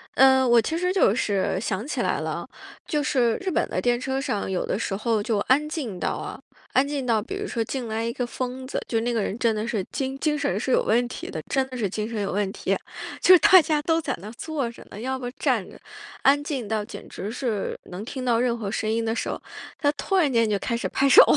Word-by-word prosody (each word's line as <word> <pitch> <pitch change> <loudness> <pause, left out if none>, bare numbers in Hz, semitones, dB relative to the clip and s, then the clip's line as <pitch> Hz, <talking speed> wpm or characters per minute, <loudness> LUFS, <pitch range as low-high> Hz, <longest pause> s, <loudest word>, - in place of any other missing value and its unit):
呃， 265 0 +6
我 240 -1 +6
其 275 +8 -1
实 360 +2 +1
就 370 - +4
是 200 -5 0
想 210 +2 -2
起 - - -2
来 - - 0
了， - - -4 0.4
就 300 -2 0
是 245 -6 +2
日 380 -1 -3
本 - - 0
的 - - -1
电 240 -1 +2
车 265 +1 -1
上 210 -8 -2
有 185 -1 -1
的 195 - -1
时 200 - -2
候 220 +1 0
就 215 +1 0
安 275 +8 +2
静 260 - -4
到 - - 0
啊 - - -6 0.4
安 260 - +4
静 285 -2 -2
到 225 -3 +2
比 265 - -6
如 410 +1 -4
说 230 - -1
进 250 +1 -4
来 220 +1 -2
一 230 - -1
个 250 -1 -2
疯 255 +1 -4
子， - - -3
就 225 - +1
那 240 +1 -1
个 225 - +1
人 200 - -2
真 230 -2 +3
的 215 +1 -2
是 230 -4 0
精 270 0 -2
精 300 +1 +1
神 285 -1 0
是 - - -3
有 - - +4
问 240 +3 +3
题 245 - -7
的， 155 - -4
真 270 -1 +2
的 255 - -6
是 210 -5 0
精 210 +3 -3
神 225 -3 -3
有 200 - -1
问 200 0 0
题， - - -1 0.4
就 370 - +8
是 365 - +9
大 370 +2 +8
家 305 -1 0
都 325 +1 +2
在 - - -2
那 200 - -8
儿 - - -7
坐 295 -7 -2
着 - - -13
呢， 205 - -8
要 260 +3 -2
不 250 -2 -4
站 275 - 0
着， - - -14 0.4
安 280 +1 +5
静 275 -7 -3
到 215 0 -1
简 - - -9
直 200 +3 -6
是 230 -4 -2
能 185 +3 -6
听 260 +1 -5
到 240 -2 +3
任 240 -1 +1
何 210 -4 -4
声 215 +1 -1
音 230 +1 0
的 225 0 0
时 - - -2
候， - - -4 0.4
他 290 - +3
突 385 - -2
然 310 -7 +3
间 230 -3 +3
就 205 -1 +1
开 235 - -1
始 235 - -2
拍 275 - +2
手。 - - +10
245 Hz, 285 characters per minute, -25 LUFS, 220-275 Hz, 0.4 s, 手